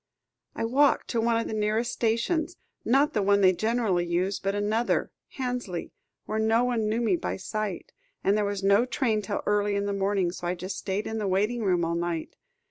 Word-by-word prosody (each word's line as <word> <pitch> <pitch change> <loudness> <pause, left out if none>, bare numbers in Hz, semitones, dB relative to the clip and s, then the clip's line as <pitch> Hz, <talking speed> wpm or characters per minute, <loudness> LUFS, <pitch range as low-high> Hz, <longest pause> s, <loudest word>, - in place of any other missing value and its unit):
"I - - -1
walked 275 +5 +3
to 230 - 0
one 230 0 +2
of 230 - -1
the - - -4
nearest 215 +2 0
stations; 305 +10 0 0.3
not 275 +5 +3
the 210 - +1
one 200 +1 +3
they 185 -1 +6
generally 220 -3 +1
use, 180 +3 -1
but 195 0 -1
another 215 +3 0 0.3
Hansley 245 -9 -3 0.3
where 215 - -2
no 225 +2 +3
one 235 -4 0
knew 225 +2 0
me 235 +9 +2
by - - -3
sight, 210 0 -4 0.3
and 195 - +3
there 210 - +1
was 200 -1 -2
no 200 +5 +4
train 235 -4 0
till 200 0 -3
early 205 0 +1
in 200 0 0
the 200 - -1
morning. 195 -2 0
So 175 -1 -6
I 180 - 0
just 185 +2 -5
stayed 200 +2 -2
in 220 0 -3
the 210 - -1
waiting 210 +6 +1
room 180 -5 +2
all 165 - -1
night. 170 -1 -3
210 Hz, 210 wpm, -27 LUFS, 195-230 Hz, 0.3 s, they